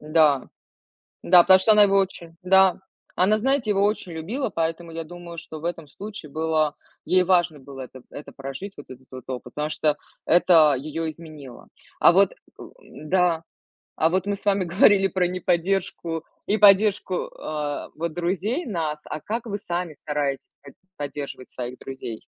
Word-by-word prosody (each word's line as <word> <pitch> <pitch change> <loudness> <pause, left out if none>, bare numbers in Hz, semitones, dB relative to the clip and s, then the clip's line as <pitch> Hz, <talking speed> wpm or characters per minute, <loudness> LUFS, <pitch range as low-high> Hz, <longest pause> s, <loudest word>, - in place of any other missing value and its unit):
Да. 150 -3 +3 0.8
Да, 180 - +8
потому 190 +1 +7
что 205 +4 +3
она 210 -1 +7
его 195 -1 +4
очень 175 -4 -2
да, 190 0 +5 0.4
она, 205 +4 +3
знаете, 265 0 0
его 200 -1 +2
очень 205 -4 -1
любила, 210 - -3
поэтому 165 0 -3
я 165 0 -5
думаю, 175 0 -10
что 160 -1 -8
в - - -7
этом 165 -3 -4
случае 200 -2 -9
было 155 -1 0 0.3
ей 185 0 +4
важно 175 -4 +2
было 135 0 -10
это 130 0 -10
это 145 - -9
прожить, 135 +9 -7
вот 145 - -10
этот 130 0 -13
вот 130 -2 -9
опыт, 125 -1 -7
потому 150 +1 -2
что 150 -1 +1 0.3
это 165 -4 +5
её 155 +4 -4
изменило. 155 -6 -11 0.3
А - - +7
вот, - - +4
э, - - -25 0.6
да, 170 +1 0 0.5
а 160 - +2
вот 185 +2 0
мы 205 - 0
с - - -16
вами 200 -2 +2
говорили 195 +3 +4
про 185 -2 0
неподдержку 175 -2 -1 0.2
и 210 - +2
поддержку, 200 -1 +5
э, 150 -2 -5
вот 165 0 -4
друзей 190 - -1
нас. 160 -8 -3
А 155 - -5
как 225 +6 -4
вы 205 -2 -3
сами 175 -3 -4
стараетесь 145 -2 -4
под 140 - -14 0.2
поддерживать 140 -2 -6
своих 125 0 -6
друзей? 130 -4 -8
165 Hz, 170 wpm, -24 LUFS, 150-190 Hz, 0.8 s, Да